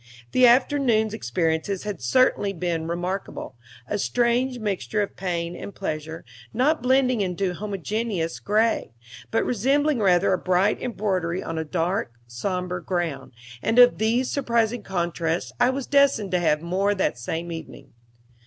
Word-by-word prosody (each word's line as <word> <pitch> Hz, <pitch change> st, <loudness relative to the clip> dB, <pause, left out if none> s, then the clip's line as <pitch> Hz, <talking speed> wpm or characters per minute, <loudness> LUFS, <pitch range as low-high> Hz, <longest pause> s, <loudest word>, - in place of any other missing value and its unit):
The 255 Hz, -1 st, +6 dB
afternoon's 240 Hz, -3 st, +3 dB
experiences 165 Hz, -, -1 dB
had 205 Hz, -8 st, -5 dB
certainly 200 Hz, -, +2 dB
been 170 Hz, -2 st, -2 dB
remarkable 175 Hz, -4 st, -4 dB, 0.3 s
a 210 Hz, -, -2 dB
strange 245 Hz, +3 st, +1 dB
mixture 210 Hz, -1 st, -1 dB
of 200 Hz, -, -7 dB
pain 175 Hz, -2 st, -3 dB
and 200 Hz, -, -8 dB
pleasure, 160 Hz, -3 st, -5 dB, 0.3 s
not 290 Hz, +6 st, +2 dB
blending 255 Hz, -2 st, +2 dB
into 185 Hz, 0 st, -1 dB
homogeneous 200 Hz, -2 st, -3 dB
gray, 215 Hz, -, +1 dB, 0.4 s
but 225 Hz, -, +1 dB
resembling 275 Hz, +4 st, +1 dB
rather 190 Hz, -1 st, +3 dB
a 185 Hz, -, 0 dB
bright 185 Hz, +3 st, +1 dB
embroidery 190 Hz, -6 st, -2 dB
on 165 Hz, -, -4 dB
a -, -, -1 dB
dark, 165 Hz, -3 st, -2 dB
somber 180 Hz, +9 st, -3 dB
ground; 165 Hz, -7 st, -3 dB, 0.3 s
and 225 Hz, -, 0 dB
of 245 Hz, 0 st, +7 dB
these 235 Hz, +4 st, +1 dB
surprising 235 Hz, -4 st, 0 dB
contrasts 170 Hz, -3 st, -2 dB
I 245 Hz, +1 st, +4 dB
was 260 Hz, 0 st, -2 dB
destined 280 Hz, -8 st, +3 dB
to 180 Hz, -, +2 dB
have 155 Hz, -2 st, +1 dB
more 195 Hz, +4 st, +1 dB
that 185 Hz, -10 st, -1 dB
same 165 Hz, +8 st, -4 dB
evening. 165 Hz, -1 st, -9 dB
195 Hz, 145 wpm, -24 LUFS, 170-235 Hz, 0.4 s, of